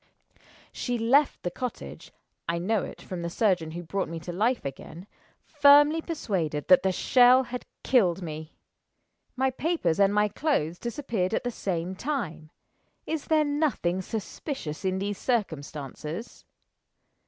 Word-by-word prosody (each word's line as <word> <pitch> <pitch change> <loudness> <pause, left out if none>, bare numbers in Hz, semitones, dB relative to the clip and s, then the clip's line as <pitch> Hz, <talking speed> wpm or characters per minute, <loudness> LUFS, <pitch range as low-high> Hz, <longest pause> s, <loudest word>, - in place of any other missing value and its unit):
She 245 -1 -2
left 260 +6 +3
the 175 - -2
cottage 250 +5 -6 0.4
I 170 - 0
know 195 +4 0
it, - - -9
from 180 -2 -6
the 170 - -3
surgeon 180 -4 +1
who 175 +1 -5
brought 190 +2 -2
me 165 0 -5
to 175 - -6
life 230 - 0
again 155 +6 -7 0.4
firmly 295 +2 +6
persuaded 185 - -2
that 185 - +8
the 190 - +1
shell 250 +6 +5
had 250 0 -7 0.2
killed 190 -8 +3
me. 155 -1 -7 0.8
My 265 0 +1
papers 260 - 0
and 200 0 +5
my 210 0 +3
clothes 185 - -1
disappeared 230 -6 -2
at - - -1
the 245 - -2
same 180 -4 -3
time. 185 - -4 0.6
Is 320 -2 -3
there 310 -1 +3
nothing 290 - 0
suspicious 215 - -5
in 190 0 0
these 200 +1 -3
circumstances? 160 - -4
200 Hz, 140 wpm, -27 LUFS, 170-260 Hz, 0.8 s, that